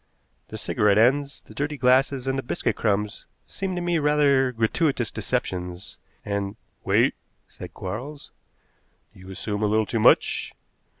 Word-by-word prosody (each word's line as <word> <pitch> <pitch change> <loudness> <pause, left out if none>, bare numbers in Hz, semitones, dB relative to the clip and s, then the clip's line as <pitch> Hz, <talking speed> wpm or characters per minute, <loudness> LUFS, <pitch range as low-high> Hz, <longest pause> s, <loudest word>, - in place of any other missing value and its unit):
The - - -7
cigarette 105 -1 +2
ends, 140 +5 +2
the - - -16
dirty 145 +1 -3
glasses, 130 +1 +3
and 135 0 0
the 135 - -1
biscuit 120 - -2
crumbs 105 -1 -1 0.2
seem 190 -2 -4
to 175 - -2
me 175 -1 +1
rather 145 -3 +3
gratuitous 120 - 0
deceptions, 90 +1 -3 0.3
and 100 0 -2
" - - -44
"Wait," - - +3 0.3
said - - -11
Quarles. 125 +10 -7 0.8
"You 95 -2 -14
assume 105 +2 -4
a 105 - +2
little 110 +1 +2
too 115 - -2
much. - - +3
120 Hz, 145 wpm, -24 LUFS, 105-140 Hz, 0.8 s, glasses